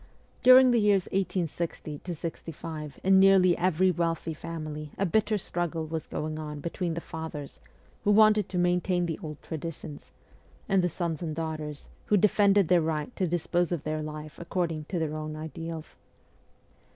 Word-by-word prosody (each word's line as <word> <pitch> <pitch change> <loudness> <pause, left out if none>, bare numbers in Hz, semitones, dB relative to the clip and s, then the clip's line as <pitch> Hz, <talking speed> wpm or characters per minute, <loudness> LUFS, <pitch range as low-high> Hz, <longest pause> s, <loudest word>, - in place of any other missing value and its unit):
During 255 0 +8
the 240 - +4
years 200 -3 +3
1860 170 -5 -2
65 160 -2 -6
in 190 0 +6
nearly 190 -2 +6
every 185 +1 +2
wealthy 165 -1 -1
family 155 -2 -6
a 200 - +1
bitter 215 +4 +2
struggle 175 -3 -3
was 160 0 -4
going 155 0 -4
on 150 -1 -6
between 170 +1 -3
the 170 - -3
fathers, 160 -4 -7 0.4
who - - +1
wanted 215 -1 +5
to 185 - -3
maintain 175 0 +2
the 165 0 -3
old 150 -4 -7
traditions, 155 -2 -7 0.6
and 195 -2 +3
the 180 - +2
sons 170 -1 -3
and 160 -3 -3
daughters, 155 -2 -5 0.2
who 210 - +4
defended 200 -1 +4
their 180 0 +4
right 155 +6 -2
to 185 - 0
dispose 175 +1 0
of 170 -5 -2
their 155 0 -2
life 155 0 -7
according 170 -3 -2
to 180 - -3
their 160 -2 -1
own 155 0 -5
ideals. 160 +1 -7
165 Hz, 160 wpm, -28 LUFS, 155-185 Hz, 0.6 s, During